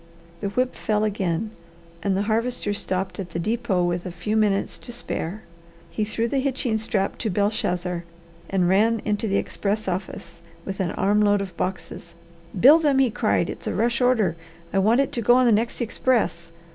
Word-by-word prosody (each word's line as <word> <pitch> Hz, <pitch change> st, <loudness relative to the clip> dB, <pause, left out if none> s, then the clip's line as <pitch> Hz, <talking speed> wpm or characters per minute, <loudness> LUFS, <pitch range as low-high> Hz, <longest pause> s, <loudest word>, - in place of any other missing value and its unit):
The 200 Hz, -, -2 dB
whip 255 Hz, +5 st, 0 dB
fell 215 Hz, -1 st, 0 dB
again 200 Hz, -1 st, -1 dB, 0.5 s
and 195 Hz, 0 st, 0 dB
the 200 Hz, -, +1 dB
Harvester 225 Hz, 0 st, -1 dB
stopped 190 Hz, -1 st, -3 dB
at 180 Hz, -3 st, -6 dB
the -, -, -2 dB
depot 215 Hz, -1 st, 0 dB
with 175 Hz, 0 st, -1 dB
a 180 Hz, -, -5 dB
few 180 Hz, +5 st, -3 dB
minutes 205 Hz, -2 st, +1 dB
to 240 Hz, -, -10 dB
spare. 215 Hz, -4 st, -5 dB, 0.5 s
He 215 Hz, -, -1 dB
threw 225 Hz, +2 st, -1 dB
the 270 Hz, +3 st, 0 dB
hitching 260 Hz, -4 st, 0 dB
strap 200 Hz, -3 st, -1 dB
to 225 Hz, -, -1 dB
Belshazzar, 180 Hz, -3 st, -1 dB, 0.5 s
and 185 Hz, -2 st, +2 dB
ran 215 Hz, +4 st, +3 dB
into 210 Hz, +1 st, 0 dB
the 200 Hz, -1 st, +1 dB
express 210 Hz, +1 st, -2 dB
office 175 Hz, -2 st, -5 dB, 0.2 s
with 195 Hz, 0 st, -5 dB
an 185 Hz, -3 st, 0 dB
arm 205 Hz, +2 st, +2 dB
load 205 Hz, -1 st, +4 dB
of 190 Hz, -3 st, -5 dB
boxes. 185 Hz, +1 st, -5 dB, 0.4 s
"Bill 290 Hz, -, +8 dB
them!" 290 Hz, -4 st, +2 dB
he 265 Hz, -3 st, +3 dB
cried. -, -, +1 dB
"It's -, -, -7 dB
a -, -, -1 dB
rush 235 Hz, +1 st, +1 dB
order. 245 Hz, -8 st, +3 dB, 0.4 s
I 195 Hz, -, +3 dB
want 225 Hz, +7 st, +4 dB
it 275 Hz, -, -1 dB
to 235 Hz, -, -2 dB
go 240 Hz, +3 st, +5 dB
on 255 Hz, 0 st, +4 dB
the 235 Hz, -, +5 dB
next 225 Hz, +2 st, +1 dB
express. 220 Hz, -8 st, 0 dB
210 Hz, 190 wpm, -24 LUFS, 190-235 Hz, 0.5 s, Bill